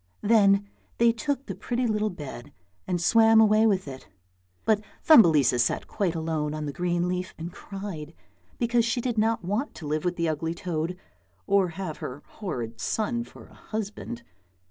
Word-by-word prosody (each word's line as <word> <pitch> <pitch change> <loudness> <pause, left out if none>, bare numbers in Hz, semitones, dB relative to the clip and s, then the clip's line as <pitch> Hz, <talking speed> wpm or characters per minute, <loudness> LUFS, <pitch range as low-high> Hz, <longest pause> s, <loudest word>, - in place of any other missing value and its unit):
Then 200 -2 +4 0.3
they 235 0 +5
took 280 +3 -2
the - - -5
pretty 245 +1 -2
little 215 -1 +1
bed 145 - -8 0.4
and 180 -1 0
swam 225 +4 +5
away 215 0 +5
with 190 -6 +1
it, 130 -1 -9 0.6
but 215 -2 +3 0.2
Thumbelisa 155 - +6
sat 120 - +1
quite 190 -5 -1
alone 160 -2 -2
on 155 -1 -4
the 145 - -4
green 175 +1 0
leaf 180 +1 -3
and 165 +2 -6
cried 185 -6 -7 0.4
because 235 0 +2
she 235 +2 0
did 240 -2 -1
not 220 -3 +1
want 210 +10 -2
to 160 - -9
live 150 +1 -1
with 180 0 0
the 170 -1 0
ugly 160 +1 -2
toad, 170 0 -3 0.5
or 200 -2 +3
have 185 -6 -4
her 135 +3 -7
horrid 120 - -6
son 235 +2 -1
for - - -14
a - - -19
husband. 220 +2 -6
190 Hz, 170 wpm, -26 LUFS, 160-225 Hz, 0.6 s, Thumbelisa